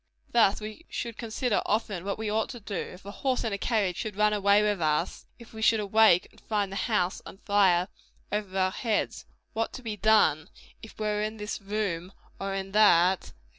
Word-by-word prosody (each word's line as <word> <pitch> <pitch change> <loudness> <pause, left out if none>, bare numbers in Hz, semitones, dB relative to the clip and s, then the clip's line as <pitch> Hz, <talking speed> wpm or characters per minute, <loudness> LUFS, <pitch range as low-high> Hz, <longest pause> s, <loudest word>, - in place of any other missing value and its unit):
Thus 220 -4 +4
we 215 +9 -9
should 235 -2 -4
consider 230 0 -1
often 205 -4 -1
what 200 - -2
we 220 0 -4
ought 215 +1 0
to 245 -3 -7
do, 205 -1 -8
if 180 +1 -5
a 200 - -6
horse 260 +3 -1
in 225 -3 -2
a - - -1
carriage 200 -7 0
should 215 -3 -4
run 210 +1 +3
away 205 0 +4
with 205 -4 0
us; 155 +2 -1
if 235 -2 -15
we 220 - -8
should 220 0 +4
awake 210 -3 +4
and - - -21
find 205 -3 -1
the - - -5
house 185 -4 0
on - - -11
fire 190 -3 +3 0.4
over 205 -2 -3
our 185 0 +2
heads 220 +1 -2 0.3
what 225 0 -2
to 255 - -8
be 220 -2 -3
done, 210 -7 +3 0.3
if 220 - -12
we 215 - -2
were 210 0 0
in 215 +1 -3
this 210 0 -5
room 195 -3 -3 0.3
or 195 0 -3
in 195 0 -4
that, 190 -3 +5
&c. - - -13
210 Hz, 210 wpm, -28 LUFS, 195-220 Hz, 0.4 s, that